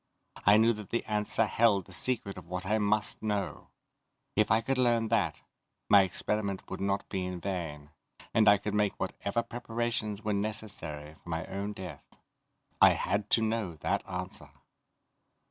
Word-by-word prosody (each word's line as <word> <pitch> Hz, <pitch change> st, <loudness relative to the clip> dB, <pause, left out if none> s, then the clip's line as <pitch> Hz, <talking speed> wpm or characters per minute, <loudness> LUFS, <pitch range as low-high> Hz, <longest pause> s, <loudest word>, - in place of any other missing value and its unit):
I 105 Hz, +1 st, +8 dB
knew 115 Hz, +2 st, +5 dB
that 105 Hz, -2 st, -8 dB
the 115 Hz, -, -1 dB
answer 105 Hz, +1 st, +1 dB
held 105 Hz, -4 st, +3 dB
the 95 Hz, -, -14 dB
secret 110 Hz, -1 st, -1 dB
of 90 Hz, -2 st, -10 dB
what 90 Hz, +1 st, -4 dB
I 110 Hz, +3 st, +1 dB
must 105 Hz, 0 st, 0 dB
know. 105 Hz, -2 st, -2 dB, 0.7 s
If 105 Hz, 0 st, +3 dB
I 110 Hz, -, +5 dB
could 130 Hz, +3 st, -1 dB
learn 120 Hz, -3 st, +3 dB
that, 95 Hz, -10 st, +1 dB, 0.5 s
my 100 Hz, -, +8 dB
experiment 100 Hz, +1 st, -2 dB
would 95 Hz, -, -4 dB
not 100 Hz, 0 st, 0 dB
be 95 Hz, -1 st, -2 dB
in 90 Hz, -1 st, -4 dB
vain, 80 Hz, -6 st, -4 dB, 0.4 s
and 110 Hz, -1 st, +4 dB
I 105 Hz, -, +7 dB
could 100 Hz, +1 st, -4 dB
make 105 Hz, -1 st, +1 dB
whatever 100 Hz, +4 st, -2 dB
preparations 115 Hz, -3 st, -3 dB
were 105 Hz, -1 st, 0 dB
necessary 100 Hz, -8 st, -1 dB
for 85 Hz, -, -15 dB
my 80 Hz, -1 st, -2 dB
own 100 Hz, +2 st, -4 dB
death. 95 Hz, -4 st, -9 dB, 0.7 s
I -, -, +8 dB
had 100 Hz, 0 st, -1 dB
to 115 Hz, -, +4 dB
know 110 Hz, -6 st, -1 dB
that -, -, 0 dB
answer. -, -, -5 dB
105 Hz, 165 wpm, -30 LUFS, 95-110 Hz, 0.7 s, I